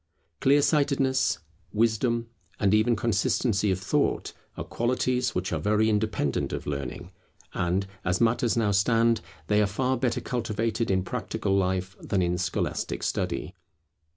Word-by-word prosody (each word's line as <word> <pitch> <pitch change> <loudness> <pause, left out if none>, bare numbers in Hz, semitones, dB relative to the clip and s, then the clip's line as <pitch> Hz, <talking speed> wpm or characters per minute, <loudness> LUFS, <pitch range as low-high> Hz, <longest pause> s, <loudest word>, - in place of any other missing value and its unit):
Clear 140 +2 +4
sightedness, 140 -3 +2 0.4
wisdom, 115 +2 +1 0.3
and 100 -1 +3
even 110 +2 +4
consistency 105 -1 +1
of 95 -1 0
thought, 95 - 0 0.2
are - - -3
qualities 125 0 0
which 90 -1 -1
are 80 - 0
very 105 +6 +2
independent 105 -9 0
of - - -4
learning; 75 +5 -5 0.4
and, 90 +3 0 0.2
as 90 0 0
matters 115 0 +2
now 110 -3 +2
stand, 115 +3 +3 0.2
they 105 +5 +3
are 105 - +3
far 130 +6 0
better 120 -1 0
cultivated 115 -1 -2
in 95 -1 +2
practical 95 +1 -2
life 95 0 0
than 95 -2 0
in 90 0 0
scholastic 95 +1 -2
study. 90 - -2
110 Hz, 140 wpm, -27 LUFS, 95-120 Hz, 0.4 s, Clear